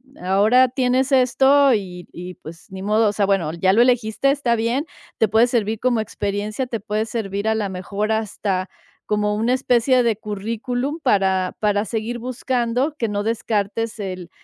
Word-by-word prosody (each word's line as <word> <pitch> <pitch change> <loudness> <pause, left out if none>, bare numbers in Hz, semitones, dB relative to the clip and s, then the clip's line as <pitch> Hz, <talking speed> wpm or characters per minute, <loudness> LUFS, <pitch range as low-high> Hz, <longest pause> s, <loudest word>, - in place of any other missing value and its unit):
eh, - - -17
ahora 215 +7 +4
tienes 255 +1 +1
esto 270 +1 +4
y 180 -5 -4
y, 180 +1 -8
pues, 160 +2 -13
ni 190 0 -7
modo, 215 +1 +2
o - - 0
sea, 205 -1 0
bueno, 195 -6 +1
ya 185 +3 +2
lo 225 - +5
elegiste, 245 +1 +2
está 275 -4 +1
bien. 235 +6 -1 0.3
Te 220 - +3
puede 225 +4 +4
servir 225 -3 -1
como 245 -2 +1
experiencia, 210 +2 -3
te 230 -2 -4
puede 210 +1 -2
servir, 210 -2 -3
a 220 - +1
la 215 -2 -1
mejor, 200 +3 -3
hasta 200 -3 -2 0.4
como 210 0 0
una 225 +4 +1
especie 250 0 +2
de 230 -3 +1
currículum 230 +8 -4
para 190 -7 +1
para 205 -1 +1
seguir 230 +2 -3
buscando 250 +3 -1
que 235 -6 -2
no 205 -1 -2
descartes 225 0 -2
el 185 -3 -6
220 Hz, 175 wpm, -21 LUFS, 200-245 Hz, 0.4 s, lo